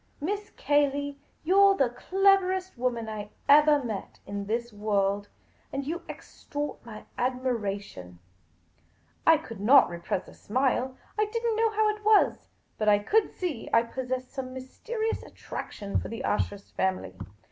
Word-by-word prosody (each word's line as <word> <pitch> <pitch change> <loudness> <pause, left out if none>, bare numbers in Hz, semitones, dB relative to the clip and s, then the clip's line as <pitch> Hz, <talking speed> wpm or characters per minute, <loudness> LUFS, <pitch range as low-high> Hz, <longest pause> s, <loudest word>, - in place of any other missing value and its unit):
Miss 410 +7 -3
Cayley, 285 -1 +1 0.2
you 360 +5 +2
're 395 0 +6
the 255 -3 +2
cleverest 375 +5 +2
woman 240 -2 -1
I 210 -1 -5 0.2
evali 295 -1 +6
met 215 -4 -5
in 200 0 -5
this 235 +1 -2
world; 205 -1 0 0.4
you 280 +6 -3
extort 290 0 -6
my 220 -3 -10
admira 245 -5 -1
tion 90 - -12 0.6
!" 85 -1 -30
I 325 -1 +8
could 230 -9 -9
not 255 +6 +6
repress 170 +2 -3
a - - -13
smile. 260 +2 0 0.2
I 425 - +4
did 460 +2 -4
n't 460 -2 +2
know 450 +1 +3
how 435 0 +2
it 425 - -17
was, 430 0 +3 0.3
but 215 -1 +3
I 205 - +6
could 415 - +2
see 335 -10 -4
I 230 - +5
possessed 255 +1 -4
some 260 -2 -5
mysterious 440 - -3
attraction 200 -1 -5
for - - -6
the 230 - -5
Ashurst 205 -1 -2
family. 185 - -1
255 Hz, 155 wpm, -28 LUFS, 210-330 Hz, 0.6 s, I